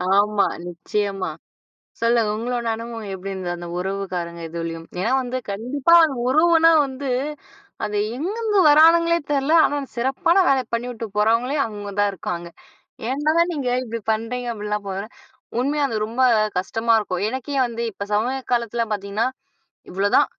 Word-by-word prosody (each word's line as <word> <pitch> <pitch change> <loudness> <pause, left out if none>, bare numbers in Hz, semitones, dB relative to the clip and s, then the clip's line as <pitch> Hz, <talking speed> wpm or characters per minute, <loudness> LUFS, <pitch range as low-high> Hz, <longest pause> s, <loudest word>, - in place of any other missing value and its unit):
ஆமா. 205 -1 +3 0.2
நிச்சயமா. 195 +1 -3 0.7
சொல்லுங்க 230 -2 +2
உங்களோட 240 0 -2
அனுபவம் 230 -2 -7
எப்படி 195 +1 -6
இருந்தது? 180 -2 -3
அந்த 175 0 -7
உறவுக்காரங்க 180 -3 -4
இதுலயும் 165 0 -5
ஏன்னா 225 +6 0
வந்து 255 0 -3
கண்டிப்பா 260 +10 +2 0.3
உறவுனா 330 +3 +5
வந்து 270 0 -5 0.8
அது 210 0 -2 0.2
எங்கேந்து 415 - 0
வரானுங்களே 335 +3 +6
தெரில. 280 +3 +1
ஆனா, 290 - -1 0.2
சிறப்பான 270 +9 +1
வேலை 265 -2 +3
பண்ணிட்டு 235 -1 -3
போறவங்களே, 230 +6 +2
அங்க 205 -2 -7
தான் 205 0 +3
இருக்காங்க. 175 -1 -5 0.6
ஏன்டா 295 +4 +1 0.2
நீங்க 285 -6 -3 0.2
இப்படி 230 -1 -5
பண்ணுறீங்க. 230 +3 -3
அப்படிலாம் 210 -1 -3
போ 195 - -3 0.7
உண்மையா 290 +3 0
அது 225 - -4
ரொம்ப 235 +4 -3 0.4
கஷ்டமா 225 +5 +1
இருக்கும். 185 -4 -3
எனக்கே 260 +4 -4
வந்து 235 -1 -4
இப்ப 200 +1 -6
சமய 245 +6 +1
காலத்தில 235 -1 0
பாத்தீங்கன்னா 200 +3 -1 0.6
இவ்ளோதான் 195 +2 +3
230 Hz, 130 wpm, -22 LUFS, 200-265 Hz, 0.8 s, வரானுங்களே